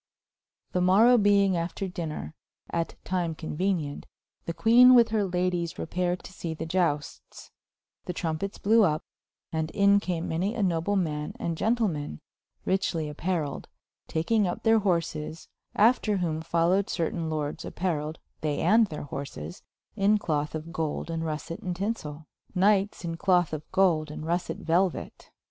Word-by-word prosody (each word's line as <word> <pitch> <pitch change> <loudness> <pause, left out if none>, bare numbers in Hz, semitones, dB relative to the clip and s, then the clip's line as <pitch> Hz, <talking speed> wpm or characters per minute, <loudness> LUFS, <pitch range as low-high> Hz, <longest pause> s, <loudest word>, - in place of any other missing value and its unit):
] - - -56
The 180 - +1
morow 210 +7 +6
beyng 200 -1 +4
after 175 +3 -2
dynner, 165 -4 -5 0.4
at 165 -1 -2
tyme 175 -3 -1
conuenenient, 160 -2 -2 0.4
the 170 - -1
Quene 245 +7 +7
with 235 -2 +6
her 215 -1 +1
Ladyes 180 -2 -1
repaired 180 +1 -2
to - - -11
see 165 -3 -5
the - - -5
Iustes, 165 -4 -2 0.5
the - - -3
trompettes 170 +3 -3
blewe 225 +3 +4
vp, 155 - -5 0.5
and 160 -1 -1
in 200 +1 +4
came 175 -4 -3
many 185 +8 -1
a 220 - 0
noble 180 +2 +1
man 150 -5 -2
and 170 - -2
Gentleman, 180 - -1 0.5
rychely 165 -5 0
appeareiled, 155 -3 -2 0.4
takynge 200 +6 +1
vp - - -7
thir 225 0 +5
horses, 165 -5 -2 0.3
after 215 -1 +3
whome 160 -3 -1
folowed 170 +4 +2
certayne 165 0 -2
lordes 150 -2 -3
appareiled, 160 -4 -2 0.3
they 150 -2 -1
and 215 +5 +4
thir 150 -1 -6
horses, 140 +5 -7 0.3
in 210 +1 +3
cloth 150 -5 -2
of 160 +1 -6
Golde 160 +1 -2
and 165 0 -2
russet 160 +1 -4
and 180 -1 -4
tynsell; 170 -7 -4 0.3
Knyghtes 200 0 +2
in 165 -1 -3
cloth 175 -2 +2
of 155 0 -6
Golde, 165 -5 +3
and 155 +1 -7
russet 170 +2 -2
Veluet. 175 +2 0
175 Hz, 150 wpm, -27 LUFS, 160-195 Hz, 0.5 s, Quene